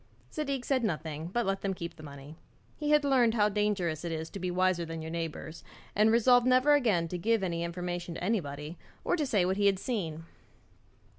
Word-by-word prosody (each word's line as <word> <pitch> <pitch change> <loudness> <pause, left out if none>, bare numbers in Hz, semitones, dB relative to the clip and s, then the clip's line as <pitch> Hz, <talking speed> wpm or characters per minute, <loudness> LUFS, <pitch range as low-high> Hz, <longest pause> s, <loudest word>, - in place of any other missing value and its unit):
Zadig 275 -4 -2
said 260 -3 +1
nothing, 160 -5 -3
but 235 +6 -1
let 195 0 -1
them 195 -1 -1
keep 170 -1 -6
the - - -13
money. 140 0 -10 0.4
He 300 -1 -3
had 300 -1 +4
learned 245 -5 +3
how 210 -2 +3
dangerous 195 -6 -1
it 170 - -3
is 160 0 -4
to 200 - -6
be 180 0 -2
wiser 185 -1 +1
than 165 -1 -6
your 160 - -6
neighbours, 165 -1 -5 0.3
and 215 +2 +5
resolved 245 +2 +5
never 255 +3 +5
again 215 -12 +2
to 180 - -4
give 225 +2 +1
any 170 -2 -1
information 175 0 -4
to - - -6
anybody, 160 -6 -3 0.2
or - - +1
to 305 -5 -1
say 205 -7 +2
what 190 +1 0
he 205 0 +3
had 195 -1 +3
seen. 170 -8 -3
185 Hz, 210 wpm, -30 LUFS, 165-230 Hz, 0.4 s, and